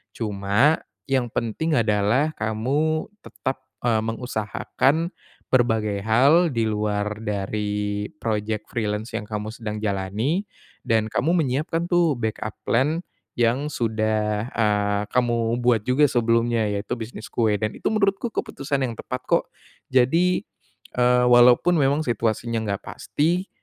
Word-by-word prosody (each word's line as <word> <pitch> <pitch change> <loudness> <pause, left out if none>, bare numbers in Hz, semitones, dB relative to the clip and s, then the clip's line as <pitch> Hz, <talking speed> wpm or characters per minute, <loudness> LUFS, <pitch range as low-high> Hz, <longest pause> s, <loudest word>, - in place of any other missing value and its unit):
cuma 105 +7 +2 0.2
yang 130 -3 0
penting 120 +8 -1
adalah 115 +6 +2
kamu 140 - 0
tetap, 130 -7 -5 0.2
eee, 115 -3 +2
mengusahakan 125 - -1 0.4
berbagai 110 -5 +1
hal 140 +9 +4
di 115 - 0
luar 105 0 -1
dari 105 0 -2 0.2
project 110 -1 -2
freelance 110 0 -2
yang - - -5
kamu 105 0 -4
sedang 110 -1 -5
jalani 105 - -1 0.4
dan 110 -1 +1
kamu 160 +9 +1
menyiapkan 155 +5 -1
tuh 175 -3 +3
backup 110 -3 -3
plan 150 +8 +2 0.3
yang 120 +4 +1
sudah, 110 -3 0
eee, 105 -2 +1
kamu 120 -2 +1
buat 120 -3 +2
juga 130 +6 +3
sebelumnya 115 -3 +2
yaitu 100 +3 -3
bisnis 110 -2 -7
kue 110 -3 +2
dan 110 +1 -2
itu - - -2
menurutku 205 +1 +1
keputusan 140 -9 -2
yang 120 - -4
tepat 125 +2 -6
kok, - - +1 0.4
jadi, 165 +9 +3 0.5
eee, 125 0 +4
walaupun 125 +7 +6
memang 145 +3 +2
situasinya 115 0 -1
enggak 100 - -3
pasti, 175 +6 -1
115 Hz, 125 wpm, -23 LUFS, 105-135 Hz, 0.5 s, walaupun